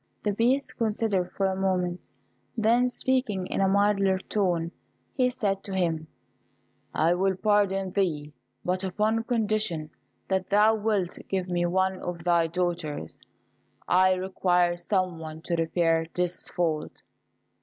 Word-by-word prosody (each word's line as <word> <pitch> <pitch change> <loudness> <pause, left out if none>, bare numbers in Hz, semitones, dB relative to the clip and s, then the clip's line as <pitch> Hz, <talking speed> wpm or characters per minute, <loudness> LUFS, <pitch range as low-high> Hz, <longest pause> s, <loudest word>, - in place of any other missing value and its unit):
The 210 - +1
Beast 250 +6 +1
considered 210 -5 0
for 195 - 0
a 190 0 +1
moment, 185 -2 0 0.6
then, 235 +3 +3
speaking 250 -7 0
in - - -2
a 195 - +4
milder 195 -1 +3
tone, 180 -4 -1 0.4
he 255 -1 +2
said 205 -6 -2
to 195 - -4
him, 165 -4 0 0.8
"I 165 +2 +2
will 190 +1 +1
pardon 195 -2 +1
thee, 155 -7 -1 0.3
but 185 +1 0
upon 215 +4 0
condition 215 -9 -1 0.4
that 190 -1 -1
thou 210 +2 +5
wilt 210 -4 -1
give 190 -1 -1
me 175 -1 +1
one 190 +1 +1
of 175 -2 -5
thy 170 -1 +3
daughters 165 - -3 0.7
I 185 +1 +4
require 180 -2 +1
some 185 -1 -1
one 160 0 -8
to 170 - -1
repair 165 0 +1
this 180 0 -1
fault." 160 -3 -2
185 Hz, 135 wpm, -27 LUFS, 175-205 Hz, 0.8 s, thou